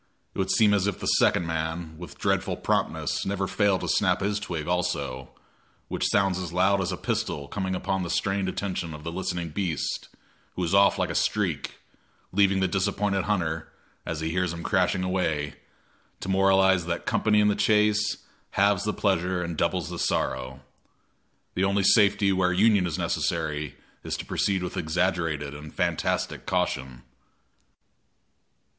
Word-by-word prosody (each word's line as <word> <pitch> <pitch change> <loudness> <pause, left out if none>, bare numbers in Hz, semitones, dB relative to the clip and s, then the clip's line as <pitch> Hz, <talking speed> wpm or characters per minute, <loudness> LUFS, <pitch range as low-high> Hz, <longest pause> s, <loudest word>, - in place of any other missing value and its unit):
It - - -7
would 95 - 0
seem 105 -2 +4
as 100 -1 +2
if 100 - -2
the - - -5
second 85 - +3
man, 80 0 -3
with 90 - -9
dreadful - - 0
promptness, - - -1
never 95 0 -1
failed 100 -1 +1
to - - -3
snap - - +2
his 105 +1 0
twig 85 -7 -4
also, 70 -8 -2 0.6
which - - 0
sounds 95 -2 +2
as 90 -3 -5
loud 95 +3 +3
as 95 0 -1
a 95 - -3
pistol 70 -4 -2
coming 95 +1 -2
upon 95 +1 -1
the 90 - -3
strained 95 0 0
attention 90 -5 -3
of 75 - -11
the 85 - -4
listening 85 -1 -3
beast, 85 -2 -2 0.5
who 90 - -2
is 85 +1 -1
off 100 0 +5
like - - 0
a - - -3
streak, - - 0 0.6
leaving 100 0 +3
the 95 - +3
disappointed 95 +1 0
hunter, 85 -6 -1 0.3
as 80 - -4
he 80 0 -2
hears 90 0 0
him 85 0 -7
crashing 95 0 +1
away, 80 -6 -1 0.7
to - - -6
moralize 95 -2 +4
that 85 0 -3
company 105 -1 +2
in 105 - +4
the 105 - +2
chase 105 0 +2 0.4
halves 100 0 +3
the 105 - 0
pleasure 90 -2 0
and 85 -1 -4
doubles - - 0
the - - -5
sorrow. 65 +1 -1 0.9
The 90 - 0
only 100 0 +2
safety 100 -1 +4
where 95 -1 +2
union 100 0 +4
is 80 - -3
necessary 75 -1 -2 0.3
is - - -3
to - - -6
proceed 95 -2 0
with 90 - -5
exaggerated 80 -3 -1
and 75 +1 -9
fantastic - - -1
caution. 65 -1 -1
90 Hz, 165 wpm, -26 LUFS, 80-100 Hz, 0.9 s, off